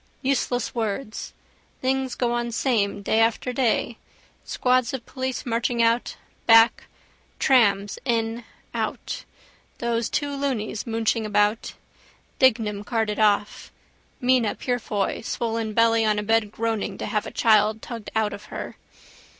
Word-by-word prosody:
Useless 255 Hz, -2 st, 0 dB
words. 220 Hz, 0 st, -3 dB, 0.5 s
Things 265 Hz, -1 st, -1 dB
go 245 Hz, -2 st, 0 dB
on 240 Hz, 0 st, -1 dB
same, 220 Hz, -5 st, 0 dB
day 220 Hz, -, +2 dB
after 230 Hz, +2 st, +1 dB
day: 235 Hz, -2 st, 0 dB, 0.4 s
squads 255 Hz, 0 st, +1 dB
of 245 Hz, -, -8 dB
police 260 Hz, -1 st, -4 dB
marching 235 Hz, 0 st, -1 dB
out, 230 Hz, +1 st, +1 dB, 0.3 s
back: 225 Hz, 0 st, +6 dB, 0.5 s
trams 205 Hz, -6 st, +3 dB
in, 230 Hz, -1 st, -1 dB, 0.3 s
out. -, -, -4 dB, 0.5 s
Those 235 Hz, -1 st, -1 dB
two 285 Hz, -1 st, -1 dB
loonies 250 Hz, -6 st, -2 dB
mooching 225 Hz, 0 st, 0 dB
about. 210 Hz, +1 st, +1 dB, 0.7 s
Dignam 220 Hz, -6 st, +2 dB
carted 220 Hz, -1 st, -1 dB
off. 205 Hz, -1 st, +1 dB, 0.5 s
Mina 250 Hz, -4 st, +2 dB
Purefoy 230 Hz, -5 st, -2 dB
swollen 225 Hz, -1 st, -2 dB
belly 230 Hz, 0 st, +4 dB
on 215 Hz, -1 st, +2 dB
a 210 Hz, -, -1 dB
bed 220 Hz, -1 st, +1 dB
groaning 220 Hz, -3 st, -2 dB
to -, -, -4 dB
have 210 Hz, -, -1 dB
a -, -, -7 dB
child 215 Hz, -1 st, +3 dB
tugged 230 Hz, -3 st, -7 dB
out 220 Hz, -1 st, +1 dB
of 210 Hz, -, -9 dB
her. -, -, -7 dB
230 Hz, 130 wpm, -24 LUFS, 215-245 Hz, 0.7 s, back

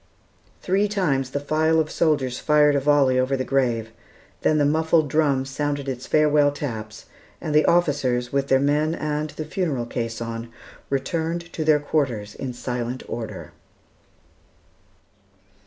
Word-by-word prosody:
Three 195 Hz, +3 st, +2 dB
times 150 Hz, -11 st, 0 dB
the 145 Hz, -, -2 dB
file 155 Hz, +2 st, +2 dB
of 155 Hz, -1 st, -1 dB
soldiers 135 Hz, -6 st, +1 dB
fired 150 Hz, -1 st, +4 dB
a -, -, +3 dB
volley 135 Hz, -2 st, +3 dB
over 130 Hz, +1 st, +1 dB
the 130 Hz, -, -1 dB
grave, 120 Hz, -5 st, 0 dB, 0.5 s
then 155 Hz, -, +2 dB
the 145 Hz, -, +3 dB
muffled 160 Hz, 0 st, +2 dB
drum 140 Hz, -4 st, +2 dB
sounded 145 Hz, +1 st, -3 dB
its 130 Hz, -1 st, -5 dB
farewell 150 Hz, -1 st, +4 dB
taps, 110 Hz, -7 st, -6 dB, 0.3 s
and 155 Hz, -, -4 dB
the 150 Hz, 0 st, +4 dB
officers, 135 Hz, -8 st, +1 dB
with 140 Hz, 0 st, +1 dB
their 135 Hz, -1 st, +4 dB
men 150 Hz, +3 st, +1 dB
and 150 Hz, -1 st, -2 dB
the 155 Hz, -, -6 dB
funeral 155 Hz, -7 st, -2 dB
caisson, 115 Hz, 0 st, -5 dB, 0.4 s
returned 165 Hz, +5 st, -2 dB
to 160 Hz, -, -2 dB
their 155 Hz, -1 st, +4 dB
quarters 125 Hz, -9 st, -1 dB
in 130 Hz, -, -5 dB
silent 125 Hz, 0 st, -4 dB
order. 115 Hz, -2 st, -6 dB
145 Hz, 140 wpm, -23 LUFS, 130-155 Hz, 0.5 s, fired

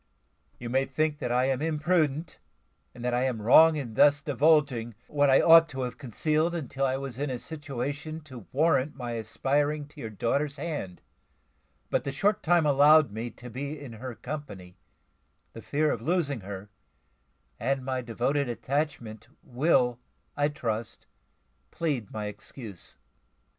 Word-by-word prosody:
You 120 Hz, -, -7 dB
may 130 Hz, +3 st, +1 dB
think 150 Hz, +2 st, -1 dB
that 125 Hz, -, -3 dB
I 125 Hz, +1 st, +3 dB
am 135 Hz, 0 st, 0 dB
imprudent, 155 Hz, -1 st, 0 dB, 0.6 s
and 120 Hz, -, -7 dB
that 125 Hz, -, 0 dB
I 125 Hz, +1 st, +1 dB
am 125 Hz, -4 st, -1 dB
wrong 155 Hz, +9 st, +7 dB
in 130 Hz, -7 st, -4 dB
thus 145 Hz, +5 st, +5 dB
divulging 140 Hz, -5 st, +2 dB
what 145 Hz, -1 st, +2 dB
I 135 Hz, -, +6 dB
ought 165 Hz, 0 st, +8 dB
to 135 Hz, -2 st, -5 dB
have 125 Hz, -1 st, -4 dB
concealed, 155 Hz, +6 st, 0 dB
until 135 Hz, -3 st, -2 dB
I 130 Hz, 0 st, 0 dB
was 135 Hz, -2 st, -6 dB
in 145 Hz, 0 st, -1 dB
a 130 Hz, -, -2 dB
situation 145 Hz, +2 st, -5 dB
to 130 Hz, -8 st, -12 dB
warrant 150 Hz, -1 st, +2 dB
my 125 Hz, -3 st, -5 dB
aspiring 145 Hz, +6 st, -1 dB
to 150 Hz, -, -12 dB
your 110 Hz, -, -5 dB
daughter's 140 Hz, +7 st, -1 dB
hand; 145 Hz, -, -5 dB, 0.9 s
but -, -, +1 dB
the 140 Hz, -, -3 dB
short 200 Hz, +9 st, +1 dB
time 170 Hz, -1 st, +3 dB
allowed 145 Hz, -1 st, +6 dB
me 110 Hz, +3 st, -4 dB
to 125 Hz, +1 st, -12 dB
be 140 Hz, +5 st, -5 dB
in 135 Hz, -5 st, -9 dB
her 120 Hz, +2 st, -7 dB
company, 105 Hz, -12 st, -8 dB, 0.8 s
the 115 Hz, -, -9 dB
fear 150 Hz, +4 st, 0 dB
of 115 Hz, -, -3 dB
losing 145 Hz, -, 0 dB
her, 100 Hz, +1 st, -8 dB, 0.9 s
and 135 Hz, -1 st, -1 dB
my 130 Hz, -1 st, -1 dB
devoted 125 Hz, +4 st, -1 dB
attachment, 120 Hz, -4 st, -3 dB, 0.2 s
will, 125 Hz, -2 st, +2 dB, 0.4 s
I 145 Hz, 0 st, +2 dB
trust, 115 Hz, -7 st, -4 dB, 0.6 s
plead 145 Hz, -, -2 dB
my 105 Hz, -1 st, -4 dB
excuse." 105 Hz, -1 st, -9 dB
135 Hz, 155 wpm, -28 LUFS, 120-150 Hz, 0.9 s, ought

